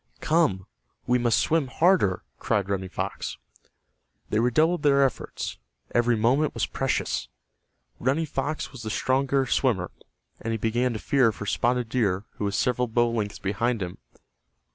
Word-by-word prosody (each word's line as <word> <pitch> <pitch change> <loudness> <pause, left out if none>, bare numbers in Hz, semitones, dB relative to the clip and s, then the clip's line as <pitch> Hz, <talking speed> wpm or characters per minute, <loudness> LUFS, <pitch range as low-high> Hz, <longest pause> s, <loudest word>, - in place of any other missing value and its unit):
"Come, 150 - +2 0.4
we 125 0 +2
must 120 -2 +2
swim 160 -4 +2
harder," 155 - +2 0.2
cried 100 -2 0
Running 95 -1 -2
Fox. - - -4 0.9
They 105 - +2
redoubled 155 +9 +2
their 140 -2 +5
efforts. 130 - -4 0.3
Every 120 0 +3
moment 130 +7 +2
was - - +1
precious. 135 -1 -1 0.7
Running 140 +6 +1
Fox 145 +1 -3
was 130 - -10
the 110 - -4
stronger 135 +4 +1
swimmer, 110 -11 +1 0.5
and 115 - -2
he - - 0
began 120 +3 0
to - - -3
fear 130 -2 +3
for 105 - -7
Spotted 120 +7 0
Deer 105 -5 0
who 105 - -2
was 100 0 -1
several 125 0 +1
bow 120 +1 +2
lengths 105 -3 -2
behind 105 +3 -1
him. 90 -1 -7
120 Hz, 150 wpm, -26 LUFS, 105-135 Hz, 0.9 s, their